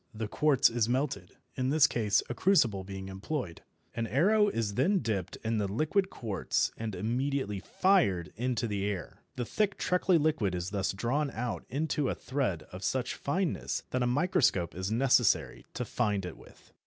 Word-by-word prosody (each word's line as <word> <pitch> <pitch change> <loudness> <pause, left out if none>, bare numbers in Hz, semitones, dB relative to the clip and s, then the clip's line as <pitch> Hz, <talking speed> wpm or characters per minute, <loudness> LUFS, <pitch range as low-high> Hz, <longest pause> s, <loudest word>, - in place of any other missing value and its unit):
The 110 0 -3
quartz 145 +4 +4
is 115 -1 +1
melted, 125 -8 -1 0.2
in 130 0 -1
this 150 +1 +5
case 105 -7 +2
a - - -3
crucible 120 - +3
being 95 0 -7
employed. 95 - -4 0.3
An 115 0 -2
arrow 205 - +4
is 115 - -1
then 170 - +2
dipped 105 -5 -2
in 110 -1 0
the 100 - 0
liquid 155 - +1
quartz 105 - -1
and 110 -3 -4
immediately 120 +1 -1
"fired" 105 - +2
into 120 +1 -1
the 100 -3 -2
air. 100 -6 -4
The 125 -2 -2
thick 205 - 0
treacly 180 0 +2
liquid 145 - +1
is 90 +1 -4
thus 100 -2 0
drawn 130 +9 -1
out 120 -2 -4
into 145 0 -1
a - - -1
thread 125 - -2
of 90 +1 -8
such 125 +4 -1
fineness 175 +4 -2
that 130 - 0
a 125 - +2
microscope 140 - +2
is 95 +2 -3
necessary 125 0 +2
to - - -2
find 105 -5 -1
it 90 - -6
with. - - -18
120 Hz, 175 wpm, -30 LUFS, 100-145 Hz, 0.3 s, this